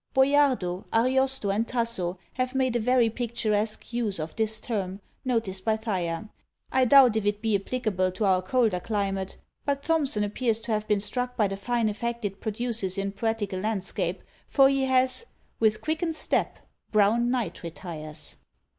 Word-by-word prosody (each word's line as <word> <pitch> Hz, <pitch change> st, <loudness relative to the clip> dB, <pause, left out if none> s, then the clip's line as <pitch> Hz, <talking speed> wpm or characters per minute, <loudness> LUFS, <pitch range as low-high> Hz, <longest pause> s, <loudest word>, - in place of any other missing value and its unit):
Boiardo, 265 Hz, -10 st, +3 dB
Ariosto 260 Hz, -1 st, +2 dB
and 220 Hz, +4 st, 0 dB
Tasso, 230 Hz, -7 st, -1 dB, 0.2 s
have 255 Hz, 0 st, -2 dB
made 260 Hz, -2 st, +1 dB
a -, -, +3 dB
very 245 Hz, +1 st, +3 dB
picturesque 220 Hz, -2 st, -2 dB
use 225 Hz, -5 st, 0 dB
of 155 Hz, +1 st, -5 dB
this 220 Hz, -1 st, -1 dB
term, 195 Hz, -5 st, -3 dB, 0.2 s
noticed 225 Hz, -7 st, -1 dB
by 220 Hz, -1 st, +2 dB
Thyer. 190 Hz, -3 st, -2 dB, 0.4 s
I 260 Hz, 0 st, +4 dB
doubt 255 Hz, -3 st, +7 dB
if 220 Hz, -, 0 dB
it 205 Hz, 0 st, 0 dB
be 220 Hz, -1 st, +1 dB
applicable 195 Hz, -3 st, 0 dB
to 205 Hz, +3 st, -1 dB
our 185 Hz, -1 st, +3 dB
colder 215 Hz, -1 st, +1 dB
climate; 195 Hz, -2 st, -2 dB, 0.3 s
but 280 Hz, 0 st, -1 dB
Thomson 290 Hz, -10 st, +1 dB
appears 225 Hz, +2 st, 0 dB
to 230 Hz, -, -5 dB
have 215 Hz, 0 st, 0 dB
been 210 Hz, -1 st, +2 dB
struck 250 Hz, +4 st, -3 dB
by 215 Hz, -4 st, +3 dB
the 195 Hz, -, -4 dB
fine 235 Hz, +3 st, 0 dB
effect 235 Hz, +2 st, -3 dB
it 195 Hz, -1 st, -4 dB
produces 220 Hz, -3 st, -1 dB
in 195 Hz, 0 st, -1 dB
poetical 205 Hz, -2 st, -2 dB
landscape; 205 Hz, -1 st, -2 dB, 0.2 s
for 270 Hz, -1 st, +5 dB
he 275 Hz, -1 st, +1 dB
has 260 Hz, -, +2 dB, 0.3 s
With 215 Hz, -1 st, +2 dB
quickened 320 Hz, +1 st, -1 dB
step -, -, 0 dB, 0.3 s
Brown 215 Hz, +3 st, +3 dB
night 240 Hz, -9 st, -2 dB
retires. 160 Hz, -3 st, -7 dB
220 Hz, 165 wpm, -27 LUFS, 195-250 Hz, 0.4 s, doubt